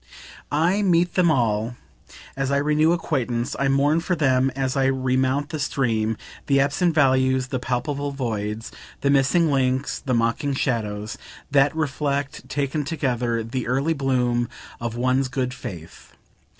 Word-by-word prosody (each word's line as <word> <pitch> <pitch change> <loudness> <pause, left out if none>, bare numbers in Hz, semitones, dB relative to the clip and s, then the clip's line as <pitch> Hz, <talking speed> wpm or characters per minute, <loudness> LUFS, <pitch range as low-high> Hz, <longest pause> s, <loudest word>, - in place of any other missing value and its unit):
I 170 +7 +2
meet 175 -2 +2
them 180 -2 +3
all, 115 -4 +1 0.6
as 135 0 -1
I 140 - +2
renew 150 +2 +3
acquaintance, 125 -8 -1
I 140 - +2
mourn 140 +4 +3
for 180 +2 -1
them 135 -4 +2
all 135 - -1
as 130 0 -1
I 135 -1 +2
remount 130 +1 +1
the 155 - -4
stream, 115 -6 0 0.3
the 140 -1 +4
absent 155 +5 +1
values, 130 -2 +3
the 130 - -2
palpable 140 +3 -2
voids, 110 -5 -3 0.3
the 140 - +2
missing 140 +4 +3
links, 130 0 0
the 130 -3 -1
mocking 115 +5 0
shadows, 105 -6 -2 0.3
that 140 +1 +4
reflect, 140 -2 -2
taken 145 +1 -1
together, 125 -6 -1
the 120 +2 -4
early 135 +6 +1
bloom 125 -4 0 0.3
of 115 -1 -4
one's 130 +2 +1
good 125 -1 -2
faith. 85 -9 -9
135 Hz, 150 wpm, -23 LUFS, 125-145 Hz, 0.6 s, the